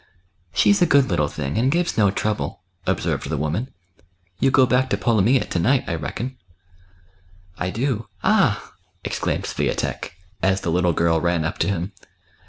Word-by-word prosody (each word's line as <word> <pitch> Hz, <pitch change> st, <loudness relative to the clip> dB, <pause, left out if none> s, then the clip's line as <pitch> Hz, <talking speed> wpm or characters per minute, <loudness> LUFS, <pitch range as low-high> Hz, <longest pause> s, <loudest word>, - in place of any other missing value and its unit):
" 95 Hz, -1 st, -44 dB
She's 205 Hz, -1 st, +4 dB
a 175 Hz, -, +5 dB
good 140 Hz, -7 st, +4 dB
little 75 Hz, -4 st, +2 dB
thing, 75 Hz, +6 st, -3 dB
and 130 Hz, +3 st, +2 dB
gives 175 Hz, +2 st, 0 dB
no 105 Hz, -3 st, +4 dB
trouble," 100 Hz, -7 st, -2 dB, 0.3 s
observed -, -, -1 dB
the 80 Hz, -, -1 dB
woman. 80 Hz, -, -2 dB, 0.4 s
" 90 Hz, 0 st, -42 dB
You 135 Hz, -, +4 dB
go 130 Hz, 0 st, +5 dB
back 130 Hz, +1 st, +2 dB
to -, -, +1 dB
Polomyja 115 Hz, +2 st, +3 dB
to 90 Hz, -, 0 dB
night, 125 Hz, +9 st, +3 dB
I -, -, -3 dB
reckon." 120 Hz, +10 st, -4 dB, 1.2 s
I 90 Hz, -, -1 dB
do 115 Hz, +1 st, -2 dB
— -, -, -32 dB
ah! -, -, +2 dB
" -, -, -42 dB
exclaimed -, -, -1 dB
Swiatek, -, -, -2 dB, 0.3 s
as 95 Hz, 0 st, +2 dB
the 85 Hz, -, -1 dB
little 90 Hz, 0 st, +2 dB
girl 80 Hz, 0 st, +2 dB
ran 85 Hz, -2 st, +1 dB
up 80 Hz, -, -3 dB
to -, -, +1 dB
him. 95 Hz, -1 st, -2 dB
95 Hz, 185 wpm, -22 LUFS, 85-130 Hz, 1.2 s, a